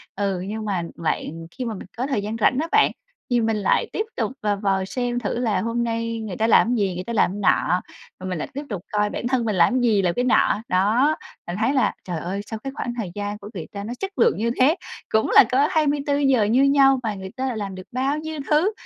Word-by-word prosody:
Ừ, 195 Hz, -2 st, -1 dB
nhưng 215 Hz, +1 st, -4 dB
mà 190 Hz, -4 st, -1 dB
bạn 165 Hz, 0 st, -3 dB
khi 255 Hz, +4 st, -5 dB
mà 230 Hz, -, -3 dB
mình 190 Hz, -, -9 dB
có 255 Hz, +3 st, -1 dB
thời 265 Hz, -7 st, 0 dB
gian 210 Hz, +2 st, -4 dB
rảnh 240 Hz, +4 st, +3 dB
á 325 Hz, -, -2 dB
bạn, 435 Hz, 0 st, +5 dB, 0.4 s
thì 240 Hz, -, +3 dB
mình 225 Hz, -1 st, +1 dB
lại 200 Hz, -, +1 dB
tiếp 430 Hz, -, -1 dB
tục 225 Hz, -2 st, -1 dB
và 210 Hz, -1 st, +1 dB
vào 195 Hz, -1 st, 0 dB
xem 245 Hz, +4 st, -2 dB
thử 235 Hz, 0 st, -2 dB
là 215 Hz, -6 st, +1 dB
hôm 230 Hz, +3 st, -1 dB
nay 230 Hz, 0 st, -2 dB
người 215 Hz, -5 st, -5 dB
ta 220 Hz, -, +2 dB
làm 225 Hz, -, +5 dB
cái 245 Hz, -, +1 dB
gì, 195 Hz, -4 st, 0 dB
người 180 Hz, -, -4 dB
ta 235 Hz, -, -5 dB
làm 210 Hz, -, +3 dB
cái 205 Hz, -, -5 dB
nọ, 180 Hz, -2 st, +2 dB, 0.4 s
rồi 185 Hz, 0 st, -5 dB
mình 180 Hz, -, -2 dB
lại -, -, -3 dB
tiếp 285 Hz, +2 st, -4 dB
tục 200 Hz, -6 st, -4 dB
coi 210 Hz, 0 st, +1 dB
bản 240 Hz, -, -3 dB
thân 250 Hz, -2 st, +1 dB
mình 215 Hz, -3 st, 0 dB
làm 185 Hz, +9 st, +4 dB
gì, 220 Hz, -4 st, +3 dB
làm 180 Hz, -2 st, +1 dB
cái 245 Hz, -, +1 dB
nọ. 230 Hz, -3 st, +3 dB
Đó, 220 Hz, +11 st, +3 dB, 0.3 s
mình 175 Hz, -, -3 dB
thấy 235 Hz, +5 st, +2 dB
là, 260 Hz, -5 st, +2 dB
trời 175 Hz, -3 st, -4 dB
ơi, 185 Hz, +5 st, -3 dB
sao 220 Hz, +1 st, -6 dB
cái 270 Hz, -, -5 dB
khoảng 240 Hz, -, -3 dB
thời 205 Hz, -7 st, -3 dB
gian 205 Hz, 0 st, -3 dB
của 205 Hz, 0 st, -10 dB
người 170 Hz, -6 st, -6 dB
ta 200 Hz, -1 st, -6 dB
nó 225 Hz, +4 st, -5 dB
chất 390 Hz, 0 st, -3 dB
lượng 470 Hz, -, +4 dB
như 230 Hz, +2 st, 0 dB
thế, 275 Hz, +6 st, +5 dB, 0.3 s
cũng 220 Hz, 0 st, +2 dB
là -, -, +10 dB
có 275 Hz, +3 st, +4 dB
24 290 Hz, -2 st, +1 dB
giờ 270 Hz, -5 st, +3 dB
như 235 Hz, +6 st, +3 dB
nhau 275 Hz, -1 st, +5 dB
mà 220 Hz, -2 st, -1 dB
người 190 Hz, 0 st, -8 dB
ta 265 Hz, -, -2 dB
lại 245 Hz, -4 st, -3 dB
làm 200 Hz, -3 st, -4 dB
được 185 Hz, 0 st, -10 dB
bao 265 Hz, +4 st, 0 dB
nhiêu 315 Hz, 0 st, -5 dB
thứ. 310 Hz, +7 st, +3 dB
225 Hz, 265 wpm, -23 LUFS, 200-260 Hz, 0.4 s, là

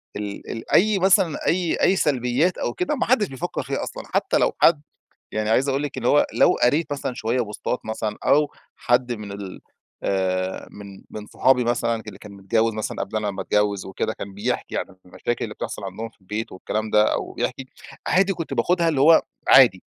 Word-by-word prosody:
ال 100 Hz, -1 st, -6 dB
ال 115 Hz, -, -7 dB
أي 210 Hz, +1 st, +4 dB
مثلًا 190 Hz, -3 st, +3 dB
أي 175 Hz, -1 st, +1 dB
أي 190 Hz, -, +4 dB
سلبيات 140 Hz, +2 st, +1 dB
أو 120 Hz, -, -2 dB
كده 180 Hz, +12 st, -1 dB
ما 260 Hz, -, -1 dB
حدش 230 Hz, -5 st, +3 dB
بيفكر 135 Hz, -4 st, -4 dB
فيها -, -, -3 dB
أصلًا، -, -, -6 dB
حتى -, -, +2 dB
لو -, -, +2 dB
حد 155 Hz, -3 st, +5 dB, 0.5 s
يعني 110 Hz, 0 st, -1 dB
عايز 130 Hz, +5 st, +3 dB
أقول 135 Hz, +1 st, 0 dB
لك 145 Hz, -3 st, -4 dB
إن 120 Hz, -, -6 dB
هو 145 Hz, -, +4 dB
لو -, -, +5 dB
قريت 145 Hz, +4 st, +2 dB
مثلًا 135 Hz, -3 st, -3 dB
شوية 120 Hz, +2 st, -1 dB
بوستات 110 Hz, +2 st, -3 dB
مثلًا 110 Hz, -1 st, -3 dB
أو 150 Hz, +1 st, +3 dB, 0.3 s
حد 120 Hz, 0 st, +1 dB
من 105 Hz, -3 st, -6 dB
ال 100 Hz, -2 st, -8 dB, 0.4 s
آآ، 95 Hz, -1 st, -1 dB
من 100 Hz, -1 st, -11 dB
من 105 Hz, -1 st, -8 dB
صحابي 125 Hz, +1 st, +2 dB
مثلًا 115 Hz, -1 st, 0 dB
اللي 100 Hz, -2 st, -9 dB
كان 105 Hz, -, -12 dB
متجوز 110 Hz, +3 st, 0 dB
مثلًا 110 Hz, -, -4 dB
قبل 105 Hz, -, -3 dB
أنا 105 Hz, -1 st, -1 dB
ما 95 Hz, -, -5 dB
أتجوز 105 Hz, -2 st, 0 dB
وكده، 95 Hz, -, -2 dB
كان 100 Hz, -1 st, -8 dB
بيحكي 100 Hz, -, -3 dB
عن -, -, -1 dB, 0.2 s
المشاكل 120 Hz, +6 st, -3 dB
اللي -, -, -6 dB
بتحصل -, -, -6 dB
عندهم 100 Hz, +4 st, -5 dB
في 115 Hz, -, -29 dB
البيت 105 Hz, +4 st, -5 dB
والكلام 110 Hz, +3 st, -3 dB
ده، 105 Hz, 0 st, +4 dB
أو -, -, -3 dB
بيحكي، 135 Hz, -, -3 dB, 0.4 s
عادي 195 Hz, +1 st, +3 dB
كنت 170 Hz, -3 st, -5 dB
باخدها 175 Hz, -1 st, +2 dB
اللي 150 Hz, -5 st, 0 dB
هو 160 Hz, +4 st, +7 dB, 0.3 s
عادي، 120 Hz, -9 st, +7 dB
115 Hz, 200 wpm, -23 LUFS, 105-145 Hz, 0.5 s, هو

